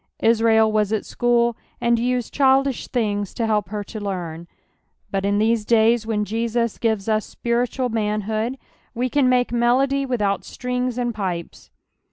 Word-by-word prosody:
Israijl 225 -1 +4
was 210 -1 +1
at 220 -2 -1
school, 235 -1 +1 0.2
and 235 -1 +2
used 245 0 -1
childish 270 -1 +2
things 205 -5 -2
to 230 - -1
help 210 -2 0
her 210 0 -4
to 215 +2 -8
learn; 175 -5 -5 0.6
but 195 0 -1
in 200 0 +1
these 220 +1 +2
days, 225 0 +3
when 210 -2 0
Jesus 230 +1 -1
gives 220 -3 0
us 215 -1 +1
spiritual 245 +1 -1
inan 210 -1 -1
hood, 220 +5 -2 0.4
we 250 +2 -1
can 275 -1 +3
make 250 -1 +2
melody 260 +4 +2
without 210 -6 0
strings 250 -1 -3
and 240 -1 -1
pipes. 185 -5 -5
225 Hz, 160 wpm, -22 LUFS, 210-245 Hz, 0.6 s, Israijl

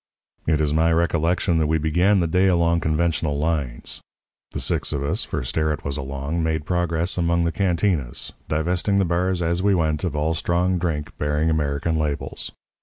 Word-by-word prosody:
"It 80 -1 +3
is 75 -1 +1
my 80 +2 +3
recollection 85 +1 +1
that 80 - +2
we 80 +1 +2
began 90 +6 +3
the 85 - +1
day 90 +4 +3
along 85 -2 +3
conventional 80 -1 0
lines. 75 -5 -2 0.5
The - - -4
six - - 0
of 70 -1 -2
us 70 - 0
for - - -3
Sterrett 75 +4 -1
was 70 -1 -1
along 70 +3 -3
made 80 -2 -1
progress 85 0 0
among 85 0 +2
the 85 - +1
cantinas, 85 -8 -1 0.2
divesting 90 +5 +1
the 100 - +3
bars 90 +1 0
as 85 +2 0
we 100 0 +3
went 80 -3 0
of 85 -4 -2
all 75 +2 +1
strong 90 +2 +1
drink 80 -4 -3
bearing 75 +2 +1
American 75 +1 0
labels. 75 -2 -3
80 Hz, 180 wpm, -23 LUFS, 75-85 Hz, 0.5 s, It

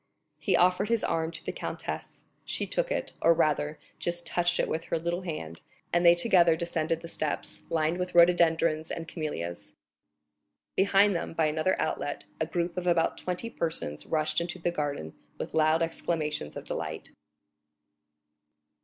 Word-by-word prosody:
He - - +2
offered 185 +4 +3
his 230 -1 +2
arm 160 0 0
to 165 - -7
the - - -1
countess; - - -5 0.2
she - - -2
took - - -1
it, - - -2
or 165 0 +5
rather 150 -1 +1 0.2
just 175 0 -2
touched 175 0 +1
it - - +2
with 160 +1 -2
her - - -1
little 170 +2 -2
hand, 85 - -6 0.3
and 175 0 +3
they 170 0 +8
together 175 -3 +5
descended 165 -1 -1
the 170 - -7
steps, 155 -2 -3
lined 165 +2 +1
with 180 -1 -3
rhododendrons 165 -2 +4
and 165 -1 -5
camellias. 85 - -5 1.0
Behind 200 0 +4
them, 170 - -3
by 165 -1 +2
another 155 +4 +1
outlet, 150 -2 -2
a 160 - 0
group 170 +1 -2
of 180 0 -2
about 170 -2 +3
twenty 180 +5 -3
persons 160 - -3
rushed 155 +1 +1
into 170 +1 -3
the 175 0 -1
garden 145 - -3 0.2
with - - -5
loud 160 +1 +3
exclamations 155 - -2
of - - -7
delight. - - -5
165 Hz, 160 wpm, -29 LUFS, 155-175 Hz, 1.0 s, they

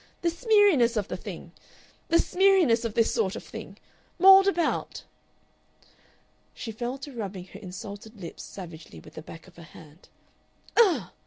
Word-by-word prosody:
The 340 - +3
smeariness 345 - +3
of 205 -2 -2
the - - -3
thing! - - -9 0.6
"The 335 - +3
smeariness 360 -11 +3
of 225 - -4
this 230 - +2
sort 205 -5 0
of - - -7
thing!... - - -10 0.4
Mauled 385 +2 +8
about!" 345 -4 -1 1.5
She 225 - -6
fell 240 +4 -4
to 275 +1 -10
rubbing 195 -6 -6
her 200 - -9
insulted 205 +3 -9
lips 170 -3 -8
savagely 165 - -10
with - - -15
the - - -8
back 165 +1 -12
of 180 - -19
her - - -11
hand. 160 0 -16 0.7
"Ugh!" 330 - +3
230 Hz, 155 wpm, -26 LUFS, -, 1.5 s, Mauled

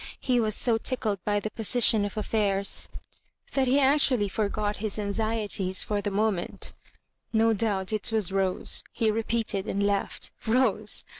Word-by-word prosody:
He 250 -2 +1
was 215 -2 +2
so 230 -2 +3
tickled 215 -7 -2
by 205 0 +1
the 215 +1 -5
position 225 -1 +3
of 205 - -6
affairs, 200 -2 +1 0.6
that 265 -1 +1
he 265 +3 +3
actual 275 -2 +4
ly 205 - +1
forgot 210 0 -2
his 215 -1 -3
anxieties 205 -2 -1
for 205 -1 -2
the 205 - -2
moment 200 -3 -2 0.6
"No 225 0 +3
doubt 200 -2 -1
it 215 +1 0
was 215 -5 0
Rose," 190 -1 +1
he 220 -1 +1
repeated 220 -2 -2
and 200 +1 -1
laughed; 200 -1 -2 0.2
Rose! 220 -3 +1
215 Hz, 155 wpm, -27 LUFS, 200-225 Hz, 0.6 s, actual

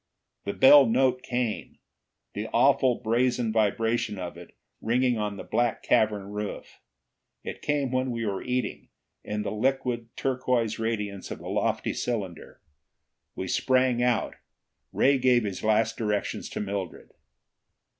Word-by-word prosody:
The 100 - -2
bell 140 0 +8
note 125 +2 +2
came, 120 -3 -3 0.6
the - - -4
awful 130 -2 +3
brazen 120 0 0
vibration 110 0 +1
of 90 -2 -6
it 85 0 -13 0.3
ringing 120 0 +1
on 105 -1 -3
the - - -7
black 120 -1 0
cavern 105 -2 +1
roof. 105 0 -6 0.6
It - - -7
came 145 -3 0
when 130 0 0
we 115 -2 -3
were 100 -2 -2
eating, 125 0 -3 0.3
in 105 0 -3
the - - -3
liquid 120 0 -1
turquoise 125 -4 0
radiance 105 -4 -3
of - - -5
the - - -8
lofty - - 0
cylinder. 100 -9 -4 0.8
We 95 - -4
sprang 130 0 +2
out. 125 -2 0 0.5
Ray 135 0 +3
gave 125 -2 +4
his 100 -3 -4
last 110 +1 +2
directions 105 -2 -2
to - - -5
Mildred. 100 -3 -5
115 Hz, 135 wpm, -27 LUFS, 105-125 Hz, 0.8 s, bell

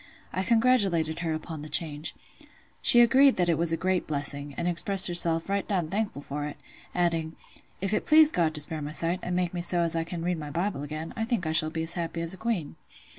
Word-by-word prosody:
I 185 - -2
congratulated 195 -8 +1
her 170 -2 -3
upon 155 -1 -8
the 150 - -9
change. 150 0 +1 0.7
She 240 - +5
agreed 265 +3 +4
that 175 -1 0
it 165 - +2
was 170 -1 +4
a 165 - -1
great 185 0 -2
blessing, 140 -1 -3
and 170 - -3
expressed 185 +2 +6
herself 170 -2 +3
"right 200 0 -3
down 180 -6 -2
thankful 200 -7 -4
for 145 +1 -6
it"; 150 - -9 0.4
adding, 165 -2 -2 0.5
"If 195 +1 -1
it - - -2
please 310 0 +6
God 160 -3 -1
to 150 - +4
spare 155 +1 +1
my 150 +1 -7
sight, 170 +3 0
and 180 - -4
make 180 -1 -2
me 175 - -4
so 175 0 +2
as 165 0 +1
I 165 - -1
can 165 0 -7
read 175 -1 -2
my 150 -1 -8
Bible 170 0 -3
again, 155 +2 -7
I 225 - -3
think 225 -6 -3
I 155 - -2
shall 155 0 +3
be 160 0 -5
as 165 +1 +3
happy 170 -1 -5
as 170 +1 0
a - - -10
queen." 215 -9 -4
170 Hz, 235 wpm, -26 LUFS, 160-190 Hz, 0.7 s, expressed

